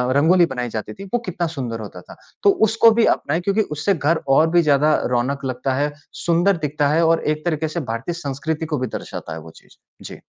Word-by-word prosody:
रंगोली 170 +5 +5
बनाई 125 -5 -4
जाती 110 -1 -5
थी, 195 - -10
वो 240 - +2
कितना 175 -2 -2
सुंदर 125 -8 -5
होता 105 -2 -9
था। - - -14 0.3
तो 410 - +6 0.2
उसको 230 +1 +5
भी 225 +1 +3
अपनाएँ 160 +5 -3
क्योंकि 200 +4 +1 0.2
उससे 180 +7 +1
घर 160 +1 0 0.2
और 160 +1 +4
भी 175 0 +5
ज़्यादा 150 +1 +3 0.2
रौनक 135 +3 -1
लगता 130 +1 -2
है, 145 +2 0 0.2
सुंदर 175 +3 +1
दिखता 150 -2 -1
है 165 +3 +3
और 165 0 +2
एक 155 +1 -10
तरीके 160 -2 0
से 155 +3 -4
भारतीय 115 +9 -3
संस्कृति 150 +3 -3
को 155 -1 -2
भी 130 - -2
दर्शाता 80 - -8
है 80 - -6
वो 80 +1 -12
चीज़। - - -23 0.3
जी। - - -10
155 Hz, 220 wpm, -21 LUFS, 135-170 Hz, 0.3 s, तो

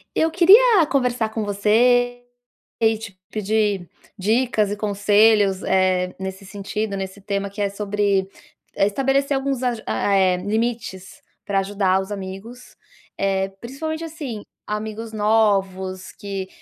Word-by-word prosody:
Eu 325 0 +2
queria 385 +3 +6
conversar 250 -5 0
com 220 0 -3
você 245 +4 +2 0.6
e 225 -1 +3
te 210 -4 -10
pedir 210 -3 0 0.3
dicas 215 +1 +1
e 205 - -2
conselhos, 205 -1 +3
eh, 185 -1 +1
nesse 190 +1 -6
sentido, 200 +1 -4
nesse 190 +1 -6
tema 200 0 -3
que 200 +2 -9
é 200 - +1
sobre, 200 -1 0 0.5
eh, 195 - +3
estabelecer 270 +6 +1
alguns 270 -1 -2
aju 240 -3 -1
a 200 - 0
eh 185 -2 +3
limites 215 -1 -3 0.2
pra 200 -1 0
ajudar 195 -1 +1
os 190 +2 -6
amigos. 200 +5 -8 0.4
Eh, 195 -1 0
principalmente, 315 +6 -5
assim, 295 - -6 0.2
amigos 220 +1 -5
novos 195 -4 0
que, 195 -2 -6
210 Hz, 130 wpm, -22 LUFS, 195-235 Hz, 0.6 s, queria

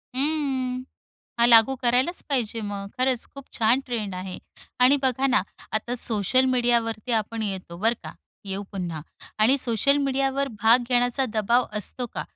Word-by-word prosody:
हं, 265 -3 0 0.6
हा 235 - +5
लागू 235 +2 +6
करायलाच 255 +8 +1
पाहिजे 235 -5 -1
मग. 200 -2 -5
खरंच 255 -2 +1
खूप 275 -1 -9
छान 230 +4 +3
ट्रेंड 215 -6 -3
आहे 185 0 -6 0.4
आणि 255 +3 +6
बघा 260 0 +1
ना, 260 -1 +2 0.3
आता 220 +3 -2
सोशल 230 +2 +2
मीडियावरती 235 -1 0
आपण 225 +1 -6
येतो 190 -4 -5
बरं 225 +5 +2
का? - - -8 0.3
येऊ 195 0 -4
पुन्हा 175 -5 -4 0.4
आणि 225 +6 +4
सोशल 255 +3 +2
मीडियावरती 270 -1 -1
भाग 235 +2 +5
घेण्याचा 245 +1 +1
दबाव 235 +3 +2
असतो 245 +4 +1
का? - - -3
240 Hz, 150 wpm, -24 LUFS, 215-260 Hz, 0.6 s, लागू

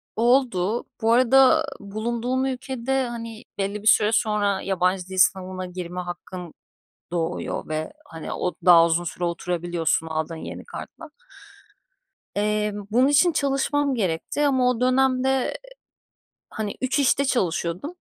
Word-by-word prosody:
Oldu. 235 -3 +2 0.2
Bu 225 +1 +2
arada 265 +5 +5
bulunduğum 235 +5 -2
ülkede, 265 0 -2
hani, 230 -1 -7
belli 200 +1 -2
bir 215 - -4
süre 210 -1 +5
sonra 205 -3 +1
yabancı 185 -1 0
dil 190 0 -7
sınavına 185 0 +2
girme 180 0 -6
hakkın 175 -1 -8 0.6
doğuyor 170 0 -3
ve, 155 0 -3
hani, 160 - -8
o 180 - -2
daha 170 -2 +8
uzun 170 +1 0
süre 175 +1 -4
oturabiliyorsun 170 -2 -1
aldığın 160 +1 -3
yeni - - -8
kartla. - - -10 1.3
Eee, 210 0 0 0.2
bunun 250 +4 +4
için 290 +5 +4
çalışmam 280 -1 0
gerekti 195 - -1
ama 260 -3 +3
o 250 -2 -1
dönem 255 0 +2
de, 265 - +2
eee, 265 -1 0 1.0
hani, 215 -2 -4
3 260 +2 0
işte 280 0 +3
çalışıyordum, 185 - -1
210 Hz, 135 wpm, -24 LUFS, 180-260 Hz, 1.3 s, daha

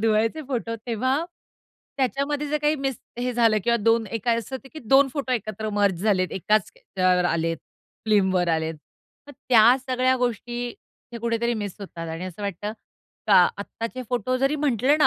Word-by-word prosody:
धुवायचे 225 +7 +1
फोटो 230 -3 -2
तेव्हा 260 +6 0 0.7
त्याच्यामध्ये 280 +4 0
जर 300 +1 0
काही 300 +1 +3
मिस 270 -3 -2 0.2
हे 250 +1 -1
झालं 230 -2 +3
किंवा 235 0 +3
दोन 225 0 +3
एक 225 +1 -5
असं 230 +2 0
होत 270 +1 -14
की 315 - -6
दोन 270 +4 +5
फोटो 275 -3 -2
एकत्र 215 -2 -3
मर्ज 200 -4 +1
झालेत 185 -4 +2
एकाच 210 +2 +1 0.3
अ, - - 0
आलेत 175 -2 +2 0.5
फिल्मवर 190 -4 +3
आलेत. 160 0 -2 0.5
मग - - -9 0.2
त्या 240 0 +7
सगळ्या 255 0 +2
गोष्टी 245 0 -2 0.5
हे 235 - -5
कुठेतरी 235 +1 0
मिस 200 -3 -5
होतात 170 -4 -7
आणि 165 +2 -5
असं 185 +2 -8
वाटतं 200 +2 -3 0.5
का 205 -3 +6 0.2
आत्ताचे 230 +5 -5
फोटो 250 +1 0
जरी 275 +3 +1
म्हटलं 280 -1 +2
ना 295 - +6
230 Hz, 165 wpm, -24 LUFS, 200-255 Hz, 0.7 s, त्या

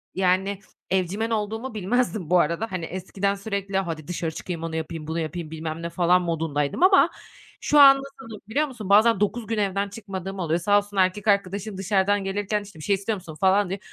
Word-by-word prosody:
yani, 190 +1 +1 0.3
evcimen 190 +4 0
olduğumu 220 +3 -3
bilmezdim 215 -3 -1
bu 180 0 +5
arada. 170 +8 0
Hani, 180 -3 -3
eskiden 190 +3 -2
sürekli 200 -1 -3
"Hadi 165 -5 -3
dışarı 170 -2 -3
çıkayım, 165 0 -6
onu 165 -1 -4
yapayım, 160 -1 -5
bunu 160 +1 -2
yapayım." 160 0 -5
bilmem 160 0 -5
ne 170 - -4
falan 175 +1 +3
modundaydım 160 - -1
ama 380 +1 +6 0.5
şu 295 - +3
an 275 -1 +9
nasılım 270 -6 -10
biliyor 295 +6 +1
musun? 230 -8 -8
Bazen 215 +1 +5
9 210 +2 -1
gün 225 0 -2
evden 200 -1 0
çıkmadığım 195 -2 -7
oluyor. 165 -1 0
Sağ 205 +4 +3
olsun 205 0 -3
erkek 190 +2 +1
arkadaşım 200 0 0
dışarıdan 195 +1 +1
gelirken, 205 +2 -2
işte, 200 -5 -14
"Bir - - -9
şey 200 - +2
istiyor 200 +3 -2
musun?" 175 -5 -10
falan 195 0 +3
diyor. 195 +2 -3
195 Hz, 195 wpm, -24 LUFS, 175-210 Hz, 0.5 s, an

